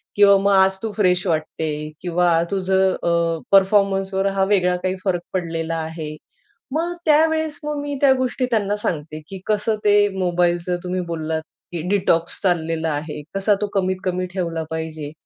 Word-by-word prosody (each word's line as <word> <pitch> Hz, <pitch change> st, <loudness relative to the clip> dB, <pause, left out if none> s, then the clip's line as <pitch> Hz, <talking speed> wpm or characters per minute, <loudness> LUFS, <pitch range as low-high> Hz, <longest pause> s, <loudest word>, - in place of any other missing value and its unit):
किंवा 200 Hz, -1 st, +6 dB
मग 200 Hz, +1 st, +2 dB
आज 190 Hz, 0 st, +4 dB
तू 220 Hz, -, -2 dB
"फ्रेश" 180 Hz, -3 st, +2 dB
वाटते 160 Hz, -1 st, -1 dB, 0.3 s
किंवा 175 Hz, -1 st, +2 dB
तुझं 190 Hz, 0 st, +2 dB
अ, 170 Hz, -1 st, +1 dB
"परफॉर्मन्सवर" 195 Hz, -1 st, +3 dB
हा 195 Hz, -, +2 dB
वेगळा 180 Hz, -3 st, +3 dB
काही 185 Hz, 0 st, 0 dB
फरक 180 Hz, -3 st, 0 dB
पडलेला 165 Hz, -2 st, -2 dB
आहे." 160 Hz, -1 st, -5 dB, 0.6 s
मग 335 Hz, +3 st, -1 dB
त्यावेळेस 315 Hz, 0 st, +2 dB
मग 300 Hz, 0 st, -2 dB
मी 285 Hz, 0 st, -4 dB
त्या 275 Hz, -2 st, +6 dB
गोष्टी 255 Hz, 0 st, -1 dB
त्यांना 205 Hz, -3 st, +1 dB
सांगते, 155 Hz, -6 st, -4 dB
की 190 Hz, +1 st, -8 dB
"कसं 215 Hz, +1 st, +1 dB
ते 205 Hz, 0 st, +5 dB
मोबाईलचं 175 Hz, 0 st, +1 dB
तुम्ही 180 Hz, 0 st, -2 dB
बोललात, 160 Hz, -1 st, -2 dB, 0.3 s
की 170 Hz, -2 st, -4 dB
"डिटॉक्स" 175 Hz, -4 st, +1 dB
चाललेला 165 Hz, -3 st, 0 dB
आहे. 150 Hz, +1 st, -5 dB
कसा 200 Hz, +1 st, +3 dB
तो 210 Hz, -, 0 dB
कमीत 185 Hz, -1 st, 0 dB
कमी 185 Hz, 0 st, -1 dB
ठेवला 170 Hz, -3 st, -2 dB
पाहिजे. 160 Hz, -2 st, -5 dB
185 Hz, 155 wpm, -21 LUFS, 165-200 Hz, 0.6 s, किंवा